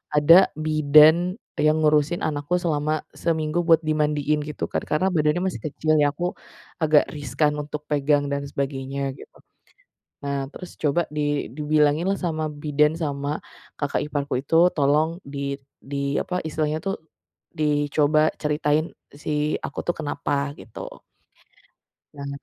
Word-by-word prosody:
ada 165 +6 +7
bidan 155 +3 +5 0.2
yang 155 +1 +4
ngurusin 150 +2 +3
anakku 145 +2 -1
selama 155 -2 0 0.2
seminggu 160 0 0
buat 165 -2 +6
dimandiin 150 -1 +1
gitu 150 0 -6
kan, - - -1
karena 155 +5 +2
badannya 150 +2 +2
masih 185 - -4
kecil 155 +1 0
ya, 145 -1 +3
aku 175 +5 -4 0.6
agak 155 -1 +5
riskan 150 0 0
untuk 150 0 -6
pegang 145 0 +2
dan 140 0 -1
sebagainya 135 -1 -3
gitu. - - -14 0.9
Nah 140 0 -1 0.2
terus 180 - -9
coba 150 +2 +2 0.2
di 145 -1 0
dibilangin 150 +1 +2
lah 195 - +1
sama 160 -3 -2
bidan 150 0 +1
sama 145 -3 -3 0.5
kakak 145 -1 0
iparku 145 -1 -3
itu 155 - -2 0.2
tolong 150 +2 +3 0.2
di 140 -1 -3 0.2
di 140 +1 -7 0.2
apa - - -4
istilahnya 155 0 -1
tuh 195 - 0 0.6
dicoba 150 0 +2 0.2
ceritain 150 +1 +1 0.4
si - - -4 0.4
aku - - -10
tuh 175 - +1
kenapa 145 -2 -3 0.3
gitu. 105 +4 -9 1.1
Nah 140 -1 -7
150 Hz, 135 wpm, -24 LUFS, 145-155 Hz, 1.1 s, ada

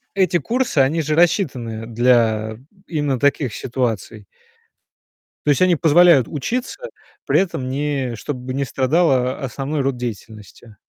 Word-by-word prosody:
Эти 185 -3 +2
курсы- 235 - -1
они 150 +5 +2
же 155 0 -2
рассчитаны 130 - 0
для 115 -2 +1 0.3
именно 145 -6 -1
таких 140 -5 +1
ситуаций. 115 -4 -3 1.2
То - - +1
есть 145 - +1
они 180 -2 +4
позволяют 160 -4 +5
учиться, 250 - -4 0.4
при - - +3
этом 150 -9 -2
не 135 -3 -2
чтобы 130 +1 -6
не 140 0 -1
страдала 130 -1 +1
о 135 - -4
основной 140 +3 -3
род 135 -1 -1
деятельности. 110 -2 -8
135 Hz, 130 wpm, -20 LUFS, 120-155 Hz, 1.2 s, позволяют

